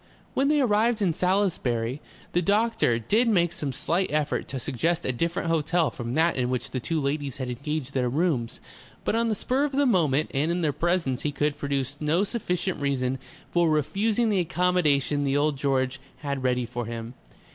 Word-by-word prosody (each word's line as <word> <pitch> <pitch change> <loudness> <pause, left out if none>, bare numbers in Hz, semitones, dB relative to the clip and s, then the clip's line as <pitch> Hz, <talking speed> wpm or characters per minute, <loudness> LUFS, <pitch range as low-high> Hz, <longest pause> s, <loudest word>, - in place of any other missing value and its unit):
When 270 - +2
they 300 0 +3
arrived 230 -2 +2
in 175 -4 +2
Salisbury, 155 - 0 0.3
the 175 - +2
doctor 205 - +2
did 215 - +2
make 175 -6 +3
some 145 -2 -3
slight 175 +8 0
effort 150 -1 0
to 135 - -5
suggest 160 +7 -1
a - - +1
different 170 +7 -2
hotel 165 0 +1
from 120 -4 -5
that 165 +2 +3
in 125 -1 0
which 125 -1 -2
the 130 - -2
two 160 +6 -1
ladies 140 -1 -2
had 130 -2 -4
engaged 140 +2 -4
their 125 -2 +1
rooms, 140 -5 0 0.5
but - - +1
on 230 +1 +2
the 215 - +1
spur 255 +7 0
of 290 -1 -1
the 285 +1 +3
moment 155 - +2
and 145 +4 +1
in 175 0 0
their 150 -2 +1
presence 170 -6 0
he 150 - -1
could 145 +1 0
produce 140 -1 -2
no 155 +5 +2
sufficient 190 -4 -2
reason 130 -2 0 0.3
for 175 -1 +3
refusing 205 - +1
the 200 - +2
accommodation 155 -4 +1
the 140 0 +1
Old 150 0 +2
George 135 -1 0 0.2
had 140 -2 -3
ready 125 -1 +1
for 120 -1 -5
him. 115 0 -6
150 Hz, 190 wpm, -26 LUFS, 135-180 Hz, 0.5 s, they